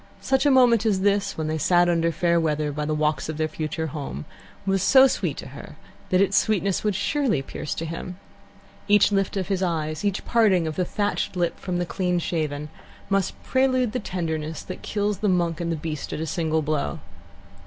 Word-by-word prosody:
Such 265 +2 +2
a - - +6
moment 245 -5 +5
as 205 -4 +1
this, 200 0 +1
when 160 - -2
they 155 0 -2
sat 175 +3 +4
under 165 -1 +2
fair 170 +1 +2
weather 150 -2 0
by 150 +1 -3
the 155 0 -1
walks 155 0 0
of 155 - -4
their 155 0 0
future 155 +1 -3
home, 145 - -5 0.4
was 195 -1 +1
so 265 +7 +7
sweet 270 - -1
to - - -7
her - - -11 0.3
that 185 - +3
its 195 0 +2
sweetness 200 -3 +1
would 210 -2 0
surely 235 - 0
pierce 150 - -5
to 165 - -4
him. 165 +2 -6 0.7
Each 205 -1 +5
lift 195 0 0
of 190 0 -2
his 190 -2 0
eyes, 155 -3 -2
each 200 -2 -1
parting 205 -7 +3
of 155 -1 -3
the 180 - 0
thatched 205 +1 -2
lip 175 -1 -1
from 180 -2 -3
the 175 - -1
clean 180 0 -1
shaven, 155 -3 -2 0.4
must 195 -2 +1
prelude 255 -3 +2
the 250 - -2
tenderness 160 -6 -3
that - - -8
kills 205 -1 -1
the 210 -1 +1
Monk 175 -2 0
and 170 0 -1
the - - 0
Beast 155 -1 -5
at - - -4
a 160 - -2
single 160 0 0
blow. 145 - -1
175 Hz, 205 wpm, -24 LUFS, 155-200 Hz, 0.7 s, so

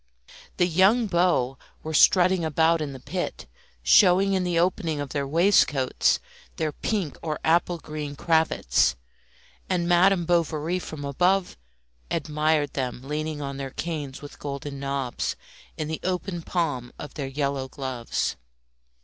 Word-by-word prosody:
The 175 - +4
young 190 +8 +4
beaux 170 -9 +1 0.2
were 160 - -5
strutting 185 +3 +5
about 160 +1 +2
in 150 -2 -3
the 135 - -9
pit, - - -4 0.4
showing 195 - +5
in 190 -1 +1
the 175 -1 0
opening 170 -3 0
of 145 -1 -4
their 140 -1 -2
waistcoats 150 -5 +3 0.4
their 155 -1 -1
pink 185 -1 -3
or 155 -2 -3
applegreen 155 -3 0
cravats, 160 - +2 0.7
and 175 -2 0
Madame 175 +1 +4
Bovary 170 0 0
from 155 -5 -7
above 180 +7 +1 0.5
admired 150 -1 0
them 130 -2 -3
leaning 150 +1 -3
on 140 0 -5
their 135 -1 -4
canes 145 -2 -5
with 145 - -11
golden 140 0 -5
knobs 135 -2 -2 0.4
in 155 - -3
the 160 0 -3
open 180 -1 -2
palm 145 -9 -2
of 150 - -8
their 140 -3 -4
yellow 140 -1 -2
gloves. 130 - -3
155 Hz, 135 wpm, -25 LUFS, 140-175 Hz, 0.7 s, strutting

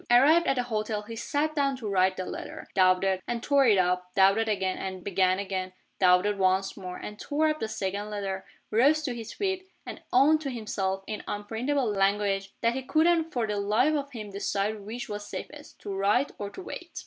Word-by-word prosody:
Arrived 295 +8 +6
at 270 - +3
the 250 - 0
hotel, 215 -2 -2
he 225 +2 -8
sat 295 +6 -1
down 280 -2 +1
to 230 -4 -6
write 190 -1 +2
the 185 - -3
letter - - -7
doubted 185 0 +3
and 240 -1 -3
tore 280 -2 +4
it 210 -3 +5
up 180 0 +1
doubted 195 +3 +4
again 190 -3 0
and 185 -1 -5
began 185 -1 +2
again 190 -2 -3 0.3
doubted 185 +2 +4
once 190 +1 +2
more 180 -2 -7
and 210 0 -8
tore 310 +2 +1
up 305 0 -1
the 220 - -2
second 205 -1 -3
letter 195 -2 -3 0.3
rose 285 +8 +4
to 265 -4 -2
his 230 -2 -7
feet 380 -2 -3 0.2
and - - -8
owned 295 +5 +5
to 280 - -3
himself 195 -5 -2
(in 215 -1 -5
unprintable 230 +6 -1
language) 195 0 +1
that 230 0 +2
he 265 - -3
couldn't 325 +4 +2
for 240 -3 0
the 210 -1 -2
life 215 +9 +2
of 285 -2 -2
him 215 -5 -7
decide 200 +2 -1
which 220 +4 -6
was 205 0 -6
safest 295 0 -8
to 200 - -6
write 205 +8 +2
or 205 - -4
to 370 - -9
wait. 355 -1 -8
210 Hz, 205 wpm, -28 LUFS, 195-270 Hz, 0.3 s, Arrived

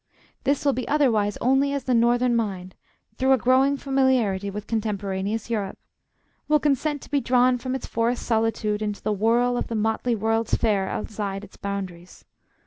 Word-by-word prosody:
This 280 +1 +1
will 280 - +4
be 255 - -4
otherwise 225 -9 +2
only 270 +3 +2
as 280 -2 -2
the 255 - 0
northern 240 +1 +3
mind, 190 -5 -2 0.4
through 265 +1 +3
a - - +4
growing 260 +3 +3
familiarity 260 -8 +1
with 205 +1 -6
contemporaneous 205 -1 -2
Europe, 205 -4 -2 0.7
will 300 0 +4
consent 290 0 0
to - - -14
be 285 -1 +2
drawn 250 0 +3
from 255 +1 -3
its 265 - -5
forest 230 +2 -1
solitude 220 -2 0
into 210 -1 -3
the 215 - 0
whirl 235 +4 +2
of - - -2
the 230 - -4
motley 220 +2 0
World's 225 +1 0
Fair 200 -4 +1
outside 205 -2 -4
its 205 - -13
boundaries. 190 -3 -6
230 Hz, 170 wpm, -24 LUFS, 205-260 Hz, 0.7 s, will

